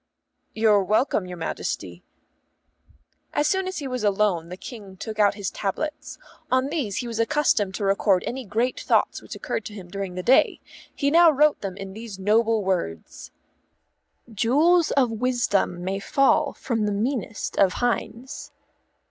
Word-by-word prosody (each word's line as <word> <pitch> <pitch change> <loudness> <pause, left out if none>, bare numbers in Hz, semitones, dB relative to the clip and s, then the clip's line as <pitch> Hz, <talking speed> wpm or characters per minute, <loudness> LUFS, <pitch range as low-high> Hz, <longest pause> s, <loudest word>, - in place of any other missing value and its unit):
"You're 215 -2 +4
welcome, 215 -1 +1
your 180 -1 -7
Majesty." 165 - -4 1.3
As 295 - +1
soon 380 +2 0
as 375 - -4
he 285 - -4
was 250 -3 -3
alone 195 -5 +1
the 180 - -7
King 200 -4 -10
took 215 +3 -6
out 205 -1 +4
his 200 -2 -4
tablets. 300 +10 -4 0.3
On 260 +1 +2
these 275 - -2
he 245 - -3
was 230 -1 -4
accustomed 230 -7 +1
to 205 - -4
record 195 -1 +2
any 260 +2 -4
great 230 +4 -1
thoughts - - +1
which - - -9
occurred - - -3
to 210 - -8
him 185 -4 -10
during 195 -1 -5
the 185 - -4
day. 255 +6 +4 0.4
He 280 -1 0
now 340 +1 +7
wrote 300 -2 +3
in 190 -2 -4
them 195 -1 -8
these 220 -2 -8
noble 220 +2 +2
words: 130 - -3 1.0
"_Jewels 290 - +3
of 255 -4 +3
wisdom 225 -6 0
may 190 +2 -2
fall 275 +6 +2
from 225 -5 -2
the - - 0
meanest 220 0 -3
of 190 -2 +4
hinds. 245 +3 -3
220 Hz, 160 wpm, -24 LUFS, 195-260 Hz, 1.3 s, now